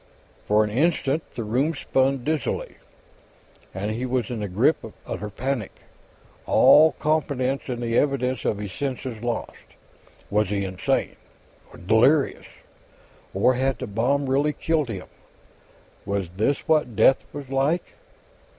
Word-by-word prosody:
For 105 Hz, +1 st, +4 dB
an 105 Hz, -, -3 dB
instant, 155 Hz, +3 st, 0 dB
the 115 Hz, -, -4 dB
room 130 Hz, +9 st, 0 dB
spun 135 Hz, -1 st, 0 dB
dizzily; 155 Hz, -1 st, -2 dB, 0.9 s
and 100 Hz, +3 st, -3 dB
he 120 Hz, +4 st, -3 dB
was 125 Hz, -2 st, -1 dB
in 120 Hz, -, -3 dB
the 105 Hz, -, -3 dB
grip 110 Hz, -, +2 dB
of 110 Hz, -, -9 dB
utter 105 Hz, -, -5 dB
panic, 125 Hz, 0 st, -3 dB, 0.8 s
all 155 Hz, 0 st, +6 dB
confidence 140 Hz, -4 st, -1 dB
in 120 Hz, -2 st, -3 dB
the 115 Hz, -1 st, -1 dB
evidence 130 Hz, -3 st, 0 dB
of 105 Hz, -, 0 dB
his 105 Hz, -2 st, -6 dB
senses 130 Hz, -1 st, -4 dB
lost. 120 Hz, -1 st, -4 dB, 0.7 s
Was 105 Hz, -1 st, +2 dB
he 100 Hz, -1 st, -1 dB
insane? 95 Hz, -1 st, -1 dB, 0.5 s
Or -, -, -13 dB
delirious? 120 Hz, -, +2 dB, 0.8 s
Or 100 Hz, +7 st, +3 dB
had 130 Hz, +1 st, 0 dB
the 130 Hz, -, -5 dB
bomb 125 Hz, +6 st, 0 dB
really 140 Hz, +3 st, +1 dB
killed 155 Hz, -5 st, 0 dB
him; 95 Hz, -5 st, -5 dB, 1.0 s
was 100 Hz, -3 st, -2 dB
this 110 Hz, +10 st, -1 dB
what 150 Hz, -8 st, +2 dB
death 120 Hz, +5 st, +4 dB
was 140 Hz, -2 st, -8 dB
like? 140 Hz, +6 st, 0 dB
125 Hz, 140 wpm, -24 LUFS, 105-140 Hz, 1.0 s, all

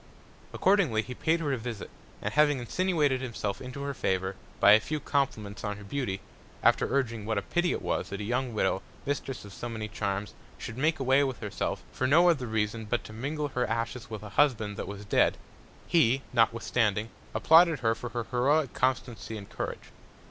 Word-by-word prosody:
Accordingly 180 Hz, -, +3 dB
he 125 Hz, -, -7 dB
paid 160 Hz, +6 st, +1 dB
her 145 Hz, -3 st, 0 dB
a -, -, 0 dB
Visit, 115 Hz, -2 st, -6 dB, 0.3 s
and 105 Hz, -, -2 dB
having 150 Hz, -1 st, +4 dB
insinuated 145 Hz, 0 st, +1 dB
himself 110 Hz, -5 st, -3 dB
into 130 Hz, +2 st, -6 dB
her 140 Hz, 0 st, -2 dB
Favour, 95 Hz, -5 st, -1 dB, 0.2 s
by 100 Hz, -, +7 dB
a 105 Hz, -, +8 dB
few 150 Hz, +7 st, -3 dB
Compliments 110 Hz, -10 st, -2 dB
on 105 Hz, -1 st, -3 dB
her 105 Hz, -, -10 dB
Beauty, 100 Hz, -3 st, -3 dB, 0.4 s
after -, -, +3 dB
urging 115 Hz, -5 st, 0 dB
what 110 Hz, 0 st, -1 dB
a 100 Hz, -, 0 dB
pity 175 Hz, 0 st, +1 dB
it -, -, -3 dB
was, -, -, -1 dB
that 100 Hz, -, -5 dB
a -, -, -3 dB
young 125 Hz, +3 st, -1 dB
Widow, 95 Hz, -3 st, 0 dB, 0.2 s
Mistress 135 Hz, -4 st, -3 dB
of 100 Hz, -, -11 dB
so 120 Hz, -, -5 dB
many 110 Hz, -2 st, -4 dB
Charms, 100 Hz, -1 st, -3 dB, 0.2 s
should 115 Hz, -, -7 dB
make 155 Hz, +4 st, +1 dB
away 135 Hz, +1 st, +4 dB
with 130 Hz, -3 st, -2 dB
herself 105 Hz, -3 st, -3 dB
for 130 Hz, -, -1 dB
no 170 Hz, +6 st, +6 dB
other 135 Hz, -7 st, -2 dB
reason 110 Hz, 0 st, -1 dB
but 120 Hz, +3 st, -1 dB
to 110 Hz, -, -10 dB
mingle 145 Hz, +6 st, -3 dB
her 125 Hz, -2 st, -1 dB
Ashes 115 Hz, +2 st, -3 dB
with 110 Hz, -2 st, -6 dB
a 105 Hz, -, -7 dB
Husband 110 Hz, -4 st, +2 dB
that -, -, -5 dB
was 100 Hz, 0 st, -7 dB
dead; 100 Hz, -, +3 dB, 0.5 s
he, 135 Hz, -5 st, +3 dB
notwithstanding, 115 Hz, -2 st, +2 dB, 0.3 s
applauded 165 Hz, -2 st, +6 dB
her 115 Hz, -2 st, +3 dB
for 115 Hz, +2 st, -6 dB
her 120 Hz, 0 st, -3 dB
heroic 135 Hz, +4 st, +1 dB
Constancy 120 Hz, -4 st, -1 dB
and 100 Hz, -2 st, -10 dB
Courage. -, -, -5 dB
120 Hz, 195 wpm, -29 LUFS, 105-140 Hz, 0.5 s, a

